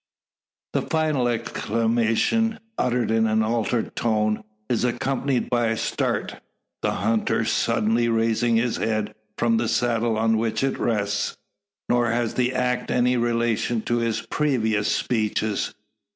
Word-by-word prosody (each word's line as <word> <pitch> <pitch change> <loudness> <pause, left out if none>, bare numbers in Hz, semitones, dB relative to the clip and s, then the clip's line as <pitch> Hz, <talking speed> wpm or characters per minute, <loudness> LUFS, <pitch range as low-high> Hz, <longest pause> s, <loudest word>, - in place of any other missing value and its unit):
The - - +1
final 155 -6 0
exclamation, 115 - 0 0.2
uttered 125 - 0
in 110 0 +3
an 110 0 +2
altered 115 +1 -1
tone, 110 -2 0 0.2
is 120 -2 0
accompanied 130 +1 0
by 120 -1 +2
a 110 0 0
start - - -2 0.4
the - - +1 0.2
hunter 110 0 +1
suddenly 115 +2 +1
raising 115 +1 +2
his 115 +1 +1
head 110 -1 -1 0.2
from 115 -1 +2
the 115 0 0
saddle 115 -1 +1
on 110 0 +2
which 115 +3 -1
it 135 - 0
rests. 100 -3 -1 0.5
Nor 120 -1 +2
has 120 0 0
the 125 0 +1
act 125 -1 0
any 125 0 +2
relation 120 -1 0
to 120 - 0
his 115 -1 0
previous 115 -5 0
speeches. 110 -3 0
115 Hz, 135 wpm, -24 LUFS, 110-120 Hz, 0.5 s, in